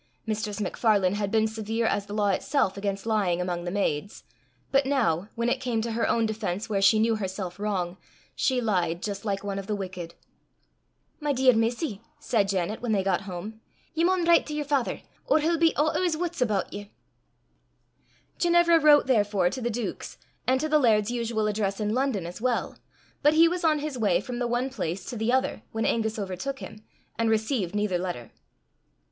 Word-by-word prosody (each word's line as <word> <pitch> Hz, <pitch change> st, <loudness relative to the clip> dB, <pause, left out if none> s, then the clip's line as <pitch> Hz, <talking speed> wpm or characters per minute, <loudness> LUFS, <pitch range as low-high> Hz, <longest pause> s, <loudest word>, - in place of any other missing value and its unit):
Mistress 215 Hz, -1 st, -3 dB
MacFarlane 200 Hz, -2 st, +2 dB
had 205 Hz, -1 st, -1 dB
been 220 Hz, +1 st, +2 dB
severe 220 Hz, +1 st, -2 dB
as 205 Hz, -2 st, 0 dB
the 205 Hz, -, -7 dB
law 205 Hz, -1 st, +2 dB
itself 200 Hz, 0 st, +1 dB
against 200 Hz, 0 st, -3 dB
lying 200 Hz, -6 st, +1 dB
among 175 Hz, -1 st, -2 dB
the -, -, -2 dB
maids, 195 Hz, -2 st, -2 dB, 0.5 s
but 275 Hz, -1 st, +3 dB
now, 205 Hz, -, +1 dB
when 235 Hz, 0 st, -1 dB
it 255 Hz, +2 st, 0 dB
came 245 Hz, -3 st, -1 dB
to 230 Hz, -, -3 dB
her 230 Hz, +1 st, 0 dB
own 230 Hz, -1 st, +2 dB
defence 215 Hz, -2 st, -3 dB
where 200 Hz, -2 st, 0 dB
she 195 Hz, +3 st, +6 dB
knew 225 Hz, +1 st, +2 dB
her 200 Hz, -3 st, -2 dB
self 185 Hz, -1 st, -6 dB
wrong, 185 Hz, -4 st, -2 dB, 0.4 s
she 255 Hz, -2 st, +1 dB
lied 180 Hz, -6 st, 0 dB
just 200 Hz, 0 st, -4 dB
like 200 Hz, -1 st, -2 dB
one 200 Hz, -1 st, -3 dB
of 195 Hz, -, -7 dB
the 210 Hz, -, -1 dB
wicked. 180 Hz, -4 st, -6 dB, 1.0 s
"My 295 Hz, -2 st, 0 dB
dear 260 Hz, -1 st, +5 dB
missie," 225 Hz, -, -1 dB, 0.2 s
said 225 Hz, -8 st, +1 dB
Janet, 195 Hz, +2 st, -1 dB
when 240 Hz, -3 st, 0 dB
they 195 Hz, -2 st, +1 dB
got 195 Hz, +1 st, -1 dB
home, 210 Hz, +5 st, -7 dB, 0.3 s
"ye 325 Hz, -, 0 dB
maun 360 Hz, 0 st, +2 dB
write 340 Hz, 0 st, +5 dB
to 300 Hz, -, -4 dB
yer 300 Hz, -, -1 dB
father, 280 Hz, -4 st, -1 dB, 0.3 s
or -, -, +4 dB
he'll 325 Hz, +2 st, +1 dB
be 330 Hz, -1 st, +5 dB
oot 310 Hz, +1 st, +2 dB
o' -, -, +1 dB
's 340 Hz, -4 st, +1 dB
wuts 345 Hz, -3 st, -3 dB
aboot 210 Hz, -6 st, 0 dB
ye." 205 Hz, 0 st, -8 dB, 1.5 s
Ginevra 345 Hz, -1 st, +5 dB
wrote 295 Hz, -1 st, +6 dB
therefore 205 Hz, -7 st, +2 dB
to 260 Hz, -, -5 dB
the 240 Hz, -, -1 dB
duke's, 235 Hz, -1 st, -4 dB, 0.3 s
and 260 Hz, +1 st, +3 dB
to 310 Hz, -, -1 dB
the 305 Hz, 0 st, +4 dB
laird's 220 Hz, -4 st, +3 dB
usual 230 Hz, -2 st, -1 dB
address 205 Hz, -2 st, -1 dB
in 210 Hz, 0 st, 0 dB
London 250 Hz, -8 st, 0 dB
as 175 Hz, +4 st, -8 dB
well; 245 Hz, -1 st, -1 dB, 0.5 s
but 295 Hz, +1 st, +4 dB
he 330 Hz, +1 st, +7 dB
was 355 Hz, +1 st, -2 dB
on 315 Hz, -2 st, +4 dB
his 295 Hz, -3 st, -4 dB
way 195 Hz, -6 st, +3 dB
from 240 Hz, +4 st, -5 dB
the 245 Hz, -, 0 dB
one 245 Hz, +3 st, -1 dB
place 185 Hz, -7 st, -4 dB
to 250 Hz, -, -6 dB
the 220 Hz, +1 st, 0 dB
other 260 Hz, +1 st, 0 dB
when 225 Hz, 0 st, -2 dB
Angus 220 Hz, -1 st, 0 dB
overtook 200 Hz, +7 st, -4 dB
him, 215 Hz, -4 st, -10 dB, 0.4 s
and 230 Hz, -1 st, +2 dB
received 220 Hz, -4 st, 0 dB
neither 205 Hz, -4 st, 0 dB
letter. 175 Hz, -11 st, -5 dB
220 Hz, 200 wpm, -26 LUFS, 195-260 Hz, 1.5 s, he